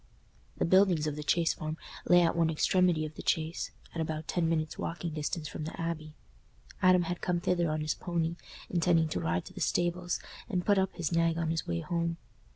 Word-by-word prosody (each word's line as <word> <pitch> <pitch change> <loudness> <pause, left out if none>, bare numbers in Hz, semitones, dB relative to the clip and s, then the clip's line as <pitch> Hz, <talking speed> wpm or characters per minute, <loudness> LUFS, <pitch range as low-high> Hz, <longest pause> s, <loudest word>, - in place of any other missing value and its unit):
The - - +1
buildings 185 -3 +4
of 150 -2 -1
the 150 - -5
Chase 165 +2 +2
Farm 155 +1 -5 0.3
lay 175 0 +7
at 165 - +2
one 165 -1 +3
extremity 170 0 +2
of 155 - -7
the - - -8
Chase, 160 +1 -1 0.2
at 165 - -2
about 155 -1 -3
ten 170 -2 +1
minutes' 155 -2 -1
walking 170 -1 -3
distance 155 +1 -3
from 155 - -6
the 160 - -7
Abbey. 160 -2 -4 0.7
Adam 185 -1 +6
had 175 +1 -3
come 175 -1 0
thither 175 -1 +1
on 155 0 -1
his 155 0 0
pony, 170 -1 -2 0.3
intending 165 -2 +2
to 90 - -2
ride 85 +1 -1
to - - -11
the - - -8
stables 175 0 0 0.3
and 180 -5 -1
put 205 -2 +4
up 190 0 0
his 170 -3 -2
nag 165 -1 +2
on 165 -1 0
his 165 -1 -2
way 85 -1 -1
home. 170 - -1
165 Hz, 210 wpm, -31 LUFS, 155-175 Hz, 0.7 s, lay